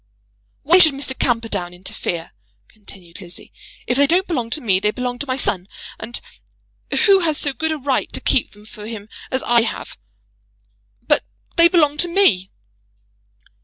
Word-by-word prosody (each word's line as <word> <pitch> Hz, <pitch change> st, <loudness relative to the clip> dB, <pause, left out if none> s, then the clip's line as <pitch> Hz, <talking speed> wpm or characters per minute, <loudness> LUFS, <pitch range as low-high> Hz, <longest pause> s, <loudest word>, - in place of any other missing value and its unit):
"Why 340 Hz, +6 st, +6 dB
should 315 Hz, -6 st, +6 dB
Mr. 270 Hz, -1 st, -2 dB
Camperdown 220 Hz, -9 st, -1 dB
interfere?" 175 Hz, -2 st, -5 dB, 0.4 s
continued 195 Hz, -4 st, -12 dB
Lizzie. 175 Hz, -2 st, -10 dB, 0.3 s
"If 245 Hz, -, 0 dB
they 285 Hz, 0 st, +5 dB
don't 360 Hz, +4 st, +3 dB
belong 250 Hz, -, -2 dB
to 305 Hz, -, -1 dB
me, 195 Hz, -8 st, +2 dB
they 210 Hz, -, +1 dB
belong 245 Hz, +2 st, -4 dB
to 290 Hz, -, -5 dB
my 255 Hz, 0 st, -1 dB
son; 190 Hz, -8 st, +1 dB, 0.3 s
and 235 Hz, +2 st, -5 dB, 0.9 s
who 395 Hz, -2 st, +6 dB
has 320 Hz, -4 st, 0 dB
so 285 Hz, -, -1 dB
good 320 Hz, +3 st, -1 dB
a 315 Hz, -, -1 dB
right 270 Hz, -2 st, -1 dB
to -, -, -3 dB
keep 250 Hz, -, +1 dB
them 210 Hz, 0 st, -17 dB
for 215 Hz, -1 st, -10 dB
him 220 Hz, -2 st, -8 dB, 0.2 s
as 260 Hz, -, -1 dB
I 235 Hz, 0 st, +4 dB
have? 225 Hz, -, -5 dB, 1.0 s
But -, -, +2 dB, 0.3 s
they 335 Hz, 0 st, +7 dB
belong 305 Hz, -5 st, +3 dB
to 350 Hz, -, +3 dB
me." 285 Hz, -, +3 dB
245 Hz, 165 wpm, -20 LUFS, 210-305 Hz, 1.0 s, they